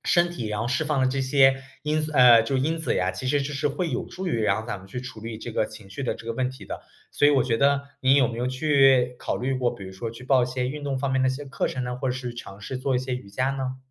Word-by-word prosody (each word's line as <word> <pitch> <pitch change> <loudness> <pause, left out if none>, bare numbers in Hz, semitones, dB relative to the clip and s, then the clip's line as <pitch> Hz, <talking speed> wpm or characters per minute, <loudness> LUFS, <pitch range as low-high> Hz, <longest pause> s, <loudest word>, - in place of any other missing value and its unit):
身 175 0 +3
体 145 -10 -5
然 105 0 -2
后 115 - -1
释 130 +5 +1
放 150 -2 0
了 130 - +3
这 135 +1 -1
些 135 0 +4 0.2
因 150 +1 0
素 155 0 -3
呃， 125 -3 +8
就 135 +4 -1
因 155 +5 0
子 160 - -1
呀， 90 0 +1
其 95 +8 -6
实 140 +2 +2
这 140 +2 -4
是 145 +1 -1
会 160 +4 -2
有 125 - -2
助 190 +1 -6
于 120 -9 0
然 110 - +2
后 110 - -10
咱 120 - -4
们 95 - -14
去 125 +6 -6
处 125 -3 -9
理 115 0 -6
这 - - -7
个 - - +1
情 100 -3 -13
绪 120 - -6
的 - - -1
这 - - -12
个 115 - -1
问 125 +2 -1
题 130 - -10
的。 - - -6 0.3
所 145 - +3
以 - - +6
我 135 -3 +4
觉 115 -2 +1
得 140 0 +3 0.2
你 130 +1 +4
有 140 -3 +5
没 115 0 -5
有 125 - 0
去， 130 -2 +4
考 - - -2
虑 130 +2 -1
过， 125 -2 0
比 100 - -9
如 95 - -8
说 110 +4 -5
去 115 +2 -11
报 130 -1 +4
一 - - -4
些 125 0 -2
运 145 +2 -6
动 135 -2 -1
方 135 -1 -1
面 130 - +2
的 130 - +3
一 130 - +1
些 145 +2 -6
课 135 - -2
程 130 - -3
呢， 125 0 -3
或 130 0 -2
者 125 - 0
是 125 -2 -5
尝 100 -4 -9
试 130 - -4
做 130 0 0
一 - - +3
些 130 0 -3
瑜 125 -5 -8
伽 125 +7 0
呢？ 130 -1 -3
130 Hz, 355 characters per minute, -25 LUFS, 120-140 Hz, 0.3 s, 呃